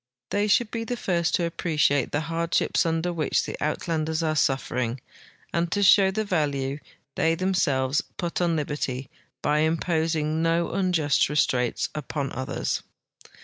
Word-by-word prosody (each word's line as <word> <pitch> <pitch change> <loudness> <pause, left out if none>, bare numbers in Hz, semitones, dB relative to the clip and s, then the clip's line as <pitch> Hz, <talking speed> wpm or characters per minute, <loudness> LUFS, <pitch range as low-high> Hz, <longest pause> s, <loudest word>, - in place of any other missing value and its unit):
They 205 +1 +1
should 215 +2 +3
be 230 -1 -3
the 245 +1 -3
first 170 -6 0
to 175 - +1
appreciate 150 -5 +1
the 145 - 0
hardships 165 +2 0
under 165 +2 0
which 155 -4 +1
the - - -5
Uit 150 +4 -2
landers 160 0 -1
are 155 -1 0
suffering, 125 -4 0 0.5
and 170 0 0
to 205 +2 +1
show 195 0 +6
the 215 +3 -1
value 145 -6 -1 0.3
they 165 +3 +2
themselves 145 -7 +1 0.2
put 175 0 -2
on 170 -2 +2
liberty 140 -4 -3 0.3
by 150 +1 +2
imposing 160 -1 0
no 165 +1 +1
unjust 175 -9 +2
restraints 125 -5 +1
upon 145 -1 -4
others. 130 +1 -2
160 Hz, 145 wpm, -25 LUFS, 145-175 Hz, 0.5 s, show